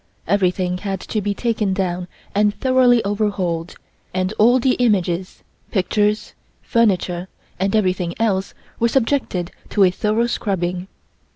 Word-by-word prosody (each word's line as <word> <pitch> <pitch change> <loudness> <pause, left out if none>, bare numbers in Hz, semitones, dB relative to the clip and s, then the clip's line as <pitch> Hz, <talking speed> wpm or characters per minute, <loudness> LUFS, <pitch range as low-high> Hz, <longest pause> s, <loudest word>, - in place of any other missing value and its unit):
Everything 180 -2 +1
had 195 -1 -3
to 215 - -2
be 205 0 -1
taken 215 -5 0
down 180 -2 -2 0.3
and 205 0 +2
thoroughly 255 -3 +4
overhauled, 195 -5 -1 0.4
and 185 +2 0
all 240 +4 +6
the 255 +1 +3
images, 185 -6 0 0.3
pictures, 210 +1 0 0.3
furniture 185 -5 +1 0.3
and 195 +2 +1
everything 185 -4 0
else 195 -4 0 0.2
were 235 - +3
subjected 230 -8 0 0.2
to 205 - +3
a 185 - +5
thorough 215 +5 +1
scrubbing. 185 -5 -2
200 Hz, 125 wpm, -20 LUFS, 180-220 Hz, 0.4 s, all